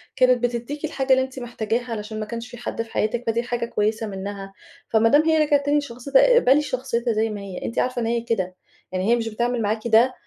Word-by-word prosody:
كانت 255 -1 +3
بتديكِ 245 +5 -2
الحاجة 270 -3 -2
اللي 260 - +4
أنتِ 260 0 -7
محتاجاها 240 0 -3
عشان 215 +1 -6
ما 215 - -3
كانش 230 +2 -6
في 240 - -10
حد 235 - -4
في 230 0 -8
حياتِك، 230 +3 -1
فدي 230 +1 +1
حاجة 240 -1 -2
كويسة 220 -1 -1
منّها. 195 0 -6 0.4
فما 225 0 +4
دام 290 +5 +6
هي 320 0 +3
رِجعت 290 -1 +2
تاني 290 +1 +3
لشخصيتها 280 - +2
اقبلي 295 - +5
شخصيتها 255 -4 -2
زي 220 +1 +1
ما 210 -2 -5
هي، 195 -2 -7
أنتِ 230 - -2
عارفة 250 -1 0
إن - - -1
هي 235 +1 0
كده، 190 -6 -2 0.4
يعني 185 +3 -1
هي - - +6
مش 225 -1 -2
بتعمل 240 +2 -1
معاكِ 220 +2 -1
ده، 235 +3 +5
235 Hz, 230 wpm, -23 LUFS, 220-255 Hz, 0.4 s, دام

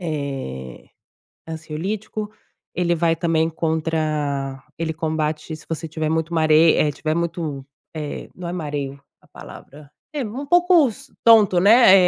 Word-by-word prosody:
eh, 135 - -5 0.6
ansiolítico. 195 +7 -4 0.4
Ele 175 -1 +1
vai 165 0 +2
também 165 -1 +1
contra 155 -4 -1 0.2
ele 160 -1 -1
combate 155 0 -2
se 155 - -16
você 165 0 -4
tiver 155 0 -2
muito 160 +1 -1
mare, 160 0 +5
eh, 150 -1 +2
tiver 155 +2 -2
muito 165 -5 -3 0.3
eh, 150 -2 -5
não 180 -1 -7
é - - -3
mareo 145 -5 -4 0.2
a - - -23
palavra. 145 0 -13 0.2
Eh, 290 -3 -2
um 245 +7 -5
pouco 350 -3 +5
s 270 +5 -11
tonto, 215 -6 +6
né, 220 +1 +7
160 Hz, 140 wpm, -22 LUFS, 150-180 Hz, 0.6 s, né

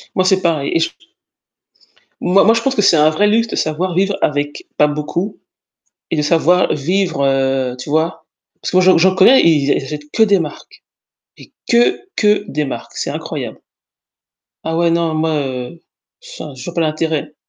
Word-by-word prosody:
Moi, 185 - +2
c'est 190 0 +2
pareil 155 -5 0
et 165 - +2
je 165 - 0
t - - -27 1.3
Moi 185 +3 +3
moi 225 - +5
je 230 - 0
pense 270 +2 -1
que 205 - +2
c'est 190 -4 +4
un 155 0 +4
vrai 205 +7 +1
luxe 230 +2 +2
de - - -5
savoir 170 +4 -2
vivre 195 +2 0
avec 145 0 -2
pas 150 - +4
beaucoup 150 +7 -4 0.7
et - - +1
de 150 - 0
savoir 170 +4 +2
vivre 170 -1 -1
heu, 135 -2 0
tu 125 - -9
vois? 160 +2 -1 0.4
Parce - - -4
que 180 - +2
moi 185 - +5
j'en 185 0 +5
j'en 185 +3 +5
j'en 185 - -4
connais, 235 +8 +6
ils 145 -4 +3
a - - +5
ils - - -3
achètent 150 +2 -8
que 225 - +4
des 200 -3 +3
marques, 150 -3 -8 0.5
et - - -16 0.2
que 240 0 +3 0.2
que 210 -1 +2
des 150 +1 -2
marques, 135 - -7
c'est - - -3
incroyable. - - -6 1.1
Ah 160 0 -2
ouais 170 0 +2
non 165 -1 0
moi, 160 0 0
heu, 125 +5 -6 0.6
enfin, 140 - -8
je 130 -1 -10
vois 175 - -7
pas 170 - -1
l'intérêt. 155 -1 -2
165 Hz, 200 wpm, -16 LUFS, 150-185 Hz, 1.3 s, connais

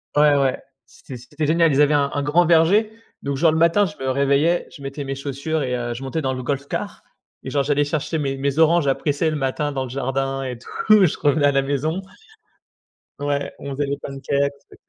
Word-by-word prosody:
Ouais, 145 -1 +5
ouais, 135 -2 0 0.2
c'était 130 - -11
c'était 150 +5 -4
génial, 165 0 +3
ils 145 - +3
avaient 150 0 +4
un 140 -1 +1
un 145 - -1
grand 160 +5 +3
verger, 175 +7 +4 0.3
donc 140 0 -2
genre 160 +1 +4
le 160 - 0
matin 170 +5 +4
je 155 - -11
me 135 - -5
réveillais, 140 +5 +2
je 140 - -12
mettais 140 +1 -5
mes 135 0 -3
chaussures 140 +3 -3
et 125 -1 -1
heu, 120 -1 -3
je 135 - -7
montais 155 +4 -3
dans 130 -1 -1
le 130 -1 -5
golf 140 +1 -3
car - - -5 0.4
et - - -7
genre 140 -1 +1
j'allais 145 +1 +1
chercher 155 +2 -2
mes 135 -2 -2
mes 140 +2 -1
oranges 165 -1 +4
à 135 - +4
presser 150 +3 -1
le - - -2
matin 145 +1 -1
dans 135 -1 -2
le - - -8
jardin 135 +1 -2
et 125 -3 -5
tout, 215 - +3
je 160 - -1
revenais 145 0 +2
à 140 - +3
la 135 0 +1
maison. 145 +5 -1 1.2
Ouais, 145 0 -2
on 140 - -6
faisait 145 +2 -1
les 140 0 -3
pancakes, 140 +1 -2 0.2
on - - -14
140 Hz, 230 wpm, -21 LUFS, 135-155 Hz, 1.2 s, Ouais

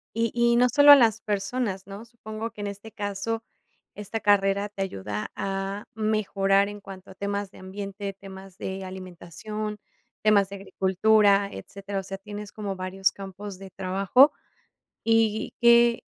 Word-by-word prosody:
Y 230 -1 +1
y 235 0 +3
no 250 +1 +4
solo 285 +4 +8
a - - +13
las 225 -4 +3
personas, 205 -1 -2
¿no? 200 +2 -9
Supongo 225 -1 -7
que, 215 - -10
en 205 - -3
este 200 +2 -8
caso, 205 +3 -3 0.5
esta 210 +2 -5
carrera 200 -1 +2
te 200 -1 -7
ayuda 105 - -4
a 195 +1 -3
mejorar 200 -2 +1
en 205 0 -9
cuanto 190 -1 -11
a - - -14
temas 200 0 -3
de - - -15
ambiente, 195 +1 -6
temas 190 -1 -12
de 190 -1 -5
alimentación, 190 +3 -7 0.5
temas 205 -2 +4
de 200 - -7
agricultura, 200 +1 +3
etcétera. 195 - -6
O - - -6
sea, 195 +1 -6
tienes 205 +1 -8
como 205 -2 -5
varios 190 +1 0
campos 195 0 -9
de 195 0 -10
trabajo. 195 - +4 0.7
Y 225 -1 +2
que, 235 0 +5
200 Hz, 155 wpm, -26 LUFS, 195-215 Hz, 0.7 s, a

